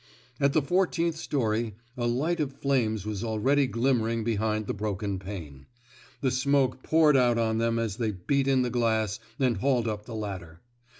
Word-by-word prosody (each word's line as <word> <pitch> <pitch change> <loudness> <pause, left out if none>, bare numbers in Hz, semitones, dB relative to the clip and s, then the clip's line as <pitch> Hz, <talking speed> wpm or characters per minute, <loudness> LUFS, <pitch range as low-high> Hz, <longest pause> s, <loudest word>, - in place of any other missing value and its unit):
At 140 -1 +3
the 155 - +3
fourteenth 170 0 +1
story, 115 -8 -1 0.2
a 120 -1 -1
light 150 +9 0
of 140 -3 -1
flames 115 -7 0
was 105 0 -3
already 130 +5 +2
glinmaering 115 -2 +1
behind 110 -1 0
the - - -2
broken 100 -1 -3
pane. 85 -9 -8 0.5
The 130 - +1
smoke 130 0 +1
poured 155 -1 +4
out 120 -3 +4
on 110 -1 +1
them 115 0 +1
as 115 -3 -2
they 115 -3 0
beat 135 +8 0
in 130 -2 +3
the 125 - -2
glass 110 -4 0 0.2
and 125 -5 +1
hauled 125 +1 +1
up 105 -1 -3
the 115 - -6
ladder. 95 -6 -6
115 Hz, 175 wpm, -27 LUFS, 110-135 Hz, 0.5 s, poured